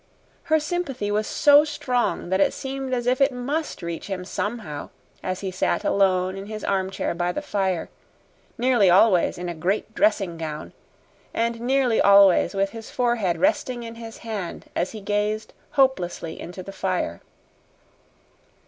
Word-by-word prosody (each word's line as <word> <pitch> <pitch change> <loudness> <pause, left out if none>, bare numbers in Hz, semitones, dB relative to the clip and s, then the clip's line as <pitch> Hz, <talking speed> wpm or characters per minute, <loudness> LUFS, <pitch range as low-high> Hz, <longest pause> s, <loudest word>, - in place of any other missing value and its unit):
Her 315 0 +3
sympathy 295 -9 -2
was 215 +1 0
so 290 0 +6
strong 250 - -1
that 190 +1 +2
it - - +3
seemed 270 0 -5
as 245 -2 -1
if 255 +2 +1
it 275 +1 +5
MUST 270 - -3
reach 170 -1 -5
him 185 -2 -4
somehow 205 -8 -4 0.3
as 185 0 -3
he 190 -2 -3
sat 185 - 0
alone 185 -1 +2
in 195 +1 -7
his 215 0 -6
armchair 190 -2 -1
by 175 +1 -1
the - - -3
fire, 190 - -1 0.7
nearly 240 -5 +4
always 185 0 +4
in 175 0 -5
a 175 - -3
great 190 +6 -2
dressing 200 - +1
gown, 155 -2 -6 0.6
and 230 0 -1
nearly 255 -2 +2
always 200 -1 +6
with 195 0 +1
his 225 -1 -9
forehead 235 -8 0
resting 240 +7 0
in 230 0 -7
his 230 -1 -9
hand 205 -6 -5
as 175 - 0
he 215 - -7
gazed 210 +2 -1 0.2
hopelessly 180 - +1
into 180 +1 -7
the 195 - -9
fire. 185 - -2
205 Hz, 155 wpm, -24 LUFS, 185-245 Hz, 0.7 s, so